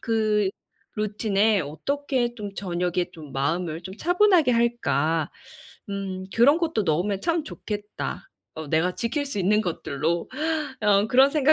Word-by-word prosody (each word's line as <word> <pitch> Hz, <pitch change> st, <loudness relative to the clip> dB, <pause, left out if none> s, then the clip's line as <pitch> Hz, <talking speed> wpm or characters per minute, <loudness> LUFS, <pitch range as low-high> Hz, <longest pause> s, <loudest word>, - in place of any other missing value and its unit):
'그 215 Hz, -3 st, +1 dB, 0.5 s
루틴에 210 Hz, 0 st, +2 dB
어떻게 240 Hz, -, -2 dB
좀 205 Hz, -3 st, -6 dB
저녁에 180 Hz, -1 st, -1 dB
좀 150 Hz, -4 st, -11 dB
마음을 160 Hz, +4 st, -1 dB
좀 190 Hz, +3 st, -8 dB
차분하게 355 Hz, -, +4 dB
할까. 165 Hz, -, +1 dB, 0.6 s
음 190 Hz, -1 st, -4 dB
그런 280 Hz, +8 st, +5 dB
것도 325 Hz, -10 st, 0 dB
넣으면 185 Hz, +5 st, 0 dB
참 335 Hz, -, 0 dB
좋겠다 210 Hz, -, -6 dB, 0.3 s
어 160 Hz, 0 st, -6 dB
내가 165 Hz, +4 st, +1 dB
지킬 270 Hz, +5 st, -1 dB
수 275 Hz, -7 st, -4 dB
있는 205 Hz, +3 st, +3 dB
것들로.' 165 Hz, -1 st, -2 dB, 0.5 s
어 205 Hz, 0 st, +4 dB
그런 265 Hz, +2 st, +6 dB
생각 300 Hz, 0 st, +4 dB
205 Hz, 260 characters per minute, -25 LUFS, 175-240 Hz, 0.6 s, 그런